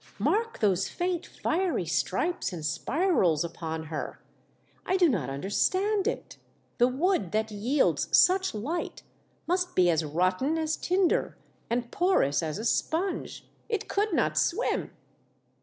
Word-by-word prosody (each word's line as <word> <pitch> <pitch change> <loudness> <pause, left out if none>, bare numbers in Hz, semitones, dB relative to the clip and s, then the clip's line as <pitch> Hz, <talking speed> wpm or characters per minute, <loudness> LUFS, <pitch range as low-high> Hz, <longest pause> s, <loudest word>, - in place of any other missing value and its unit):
Mark 455 +2 0
those 195 -3 +2
faint 355 -1 -2
fiery 330 - -1
stripes 190 - -1
and 165 -4 -6
spirals 175 - +1
upon 160 -1 -5
her. 155 -1 -5 0.6
I 375 - +1
do 360 -2 +5
not 185 - 0
under 140 +9 -5
stand 395 - +1
it. - - -4 0.4
The 245 - +6
wood 265 - 0
that 220 0 0
yields 240 +8 +1
such 375 - +4
light 290 +12 -4 0.4
must 360 +1 -1
be 180 -1 +5
as 160 -1 +1
rotten 185 - 0
as 315 -1 0
tinder 365 0 +1 0.3
and 240 0 -2
porous 350 - +2
as 160 +1 -3
a 220 - -5
sponge. 340 +10 -1 0.2
It 435 -4 -2
could 415 +1 0
not - - +1
swim." - - 0
255 Hz, 140 wpm, -28 LUFS, -, 0.6 s, The